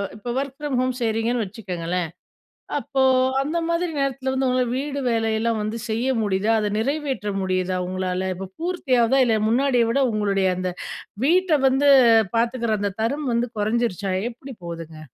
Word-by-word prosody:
இப்ப 235 +3 -5
work 275 -1 -5
from 295 -4 -2
home 255 0 0
செய்றீங்கன்னு 225 +1 0
வச்சுக்கங்களேன். 180 -4 -4 0.7
அப்போ 270 -1 -1 0.4
அந்தமாதிரி 335 +3 -1
நேரத்தில 270 -1 -1
வந்து 265 0 +1
உங்களால 250 -1 +1
வீடு 280 +1 -3
வேலையெல்லாம் 225 0 0
வந்து 215 +2 -3
செய்ய 230 +4 0
முடியுதா? 205 +1 +1
அத 210 - 0
நிறைவேற்ற 270 -3 -2
முடியுதா 185 -1 0
உங்களால? 185 0 -2
இப்ப 190 +1 -7
பூர்த்தியாவுதா? 270 -8 +2
இல்ல 225 -2 +2
முன்னாடிய 250 0 +3
விட 275 - +1
உங்களுடைய 200 -3 +1
அந்த 185 0 -2 0.5
வீட்ட 360 +3 +3 0.2
வந்து 270 +2 +3 0.5
பார்த்துக்கிற 235 -1 0
அந்த 200 0 -1
தரம் 280 +4 -1
வந்து 235 +1 +1
குறைஞ்சிருச்சா? 210 -3 0 0.2
எப்பிடி 255 +2 -10
போகுதுங்க? 165 -2 -7
235 Hz, 145 wpm, -23 LUFS, 205-270 Hz, 0.7 s, முன்னாடிய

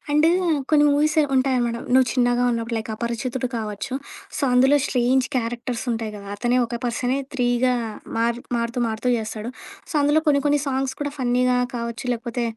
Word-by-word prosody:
And 300 +2 +4 0.4
కొన్ని 295 -1 +5
movies 300 +2 +2 0.2
ఉంటాయనమాట. 255 -3 +1 0.2
నువ్వు 260 -1 +6
చిన్నగా 245 -1 +2
ఉన్నప్పుడు 230 0 -2
లైక్ 220 0 -6
'అపరిచితుడు' 240 +3 -3
కావచ్చు. 215 +3 -4 0.4
సో, - - -4
అందులో 265 +3 +5
స్ట్రేంజ్ 255 +1 +2
క్యారెక్టర్స్ 240 +1 -3
ఉంటాయి 225 -2 -3
కదా! 200 -1 -10
అతనే 240 +3 +1
ఒక 235 - -4
పర్సనే 245 +2 0 0.2
త్రీగా 250 0 +2 0.4
మారు 235 +1 0 0.2
మారుతూ 235 +1 -2
మారుతూ 225 +3 -1
చేస్తాడు. 220 +1 -5 0.4
సో, - - -8
అందులో 295 +2 +3
కొన్ని 280 -2 +3
కొన్ని 290 0 +3
సాంగ్స్ 265 -1 -1
కూడా 290 -1 -2
ఫన్నీగా 250 0 +2 0.2
కావచ్చు, 235 +1 -4
లేకపోతే 235 +1 -3
245 Hz, 160 wpm, -23 LUFS, 235-265 Hz, 0.4 s, నువ్వు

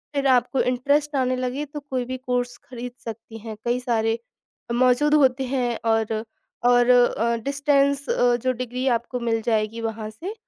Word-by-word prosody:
फिर 275 -1 +1
आपको 255 0 +3
इंटरेस्ट 285 +4 +1
आने 255 -1 +1
लगे 255 +3 -2
तो 295 +1 -7
कोई 265 -4 -3
भी 255 +1 -4
कोर्स 245 -1 -2
खरीद 245 -1 -6
सकती 225 0 -8
हैं, 220 0 -8
कई 240 +1 +1
सारे 225 -2 0 0.5
मौजूद 255 +4 +3
होते 265 -2 +3
हैं 250 -3 -1
और 220 0 0 0.4
और 245 0 +5
अ, 240 -2 +4
डिस्टेंस 280 0 +1
अ, 245 0 +3
जो 255 +2 0
डिग्री 250 +1 -3
आपको 245 +2 -6
मिल 225 -1 0
जाएगी 220 0 -1
वहाँ 225 -1 -4
से 335 - -7
250 Hz, 165 wpm, -23 LUFS, 235-270 Hz, 0.5 s, और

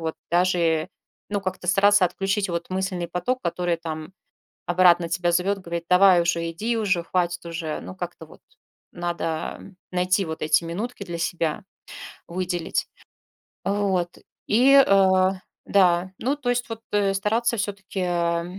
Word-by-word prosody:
вот 160 -1 -3 0.2
даже, 170 -2 +2 0.4
ну, 205 - -1
как-то 185 -2 -5
стараться 200 +1 +5
отключить 195 +2 -1
вот 170 0 -3
мысленный 185 -2 -2
поток, 180 +10 -2
который 175 0 -1
там 160 +1 -6 0.5
обратно 175 -1 +4
тебя 175 +1 0
зовет, 190 +3 +1
говорит: 170 -2 -5
"Давай 180 0 +6
уже 170 -1 -1
иди, 220 +8 -2
уже 195 -6 0
хватит 175 -1 -1
уже". 165 -2 -4
Ну, 95 +2 -8
как-то - - -7
вот - - -17 0.5
надо, 175 -1 -4 0.3
а, - - -15 0.3
найти 185 +2 +1
вот 160 -1 -6
эти 155 +2 +3
минутки 200 +7 -5
для 170 -2 -6
себя, 170 +2 -1 0.7
выделить. 175 -1 -2 0.8
Вот. 195 -3 0 0.3
И, 250 +6 +5
э, 190 -1 +4 0.4
да, 180 -2 +3
ну, 270 +4 0
то 250 -4 -3
есть 245 0 -2
вот, 225 0 -6
э, 200 -1 +2
стараться 225 +4 0
все-таки, 195 -1 -4
э, 170 -1 0
180 Hz, 145 wpm, -24 LUFS, 170-195 Hz, 0.8 s, Давай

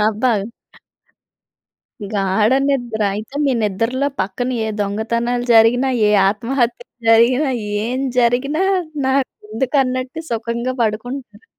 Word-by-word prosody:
అబ్బా! 220 +4 +1 1.8
గాఢ 195 +2 +2 0.2
నిద్ర. 245 -5 -1
అయితే, 215 +6 -7
మీ 275 - +2
నిద్రలో 230 +7 0
పక్కన, 225 +7 -2 0.2
ఏ - - -2
దొంగతనాలు 235 +4 -1
జరిగినా, 235 +4 +5 0.2
ఏ - - +3 0.2
ఆత్మహత్యలు 235 +3 -2 0.2
జరిగినా, 250 +5 +4 0.4
ఏం 250 +2 -2 0.2
జరిగినా 255 +7 +2 0.4
నాకు 265 0 +1 0.2
ఎందుకు 255 +6 -1
అన్నట్టు 255 +4 -3
సుఖంగా 235 +2 -2
పడుకుంటారు. 225 0 -4
235 Hz, 105 wpm, -19 LUFS, 220-255 Hz, 1.8 s, జరిగినా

